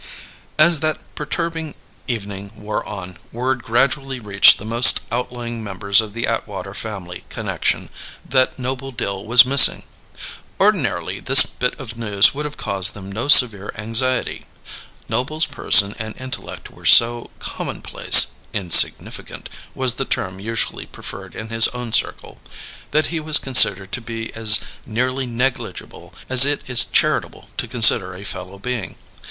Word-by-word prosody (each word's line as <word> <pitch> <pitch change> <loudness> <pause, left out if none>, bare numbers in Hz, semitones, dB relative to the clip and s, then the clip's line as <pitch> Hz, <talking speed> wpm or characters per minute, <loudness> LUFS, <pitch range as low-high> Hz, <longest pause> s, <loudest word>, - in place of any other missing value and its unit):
As 160 +1 +3
that 155 +1 -3 0.2
perturbing 160 0 -7 0.3
evening 100 -4 -8
wore 105 0 -7
on, 95 -4 -10
word 125 +1 -5
gradually 135 +3 -3
reached 100 -3 +4
the 100 - -12
most 120 +3 +5
outlying 120 -1 -7
members 100 +1 0
of 105 -1 -12
the 115 - -4
Atwater - - -7
family 95 -5 -9
connection - - -5 0.4
that 130 0 -1
Noble 130 +1 -7
Dill 100 -6 -7
was 120 +3 +4
missing. 135 +1 +5 0.8
Ordinarily, - - -2
this - - +7
bit 125 +3 -6
of 115 -4 -10
news 105 -2 +2
would 150 +2 -7
have 150 - -9
caused 95 -1 +1
them 100 -1 -12
no 115 +7 -6
severe 115 -8 +5
anxiety. 120 +4 -1 0.6
Noble's 155 +5 -3
person 100 0 +3
and 110 0 -9
intellect 130 0 -10
were - - -21
so 120 0 +4
commonplace - - +3 0.2
"insignificant" 90 -5 +2 0.3
was 130 -2 0
the 130 - -6
term 95 -5 -6
usually 115 +3 -5
preferred - - -10
in 110 +1 -10
his 115 0 +4
own 120 -2 -8
circle - - -3 0.5
that 155 +2 -2
he 165 - -4
was 155 -1 +3
considered 100 -7 +4
to 120 - -6
be 115 0 -9
as 110 -2 +5 0.3
nearly 130 +3 -5
negligible 125 +2 -7 0.2
as 130 0 +6
it 145 +1 -2
is 125 -2 +5
charitable - - -3
to 125 - -5
consider 110 -6 +2
a 95 - -13
fellow 95 -1 -9
being. 115 -1 -7
115 Hz, 145 wpm, -17 LUFS, 105-130 Hz, 0.8 s, this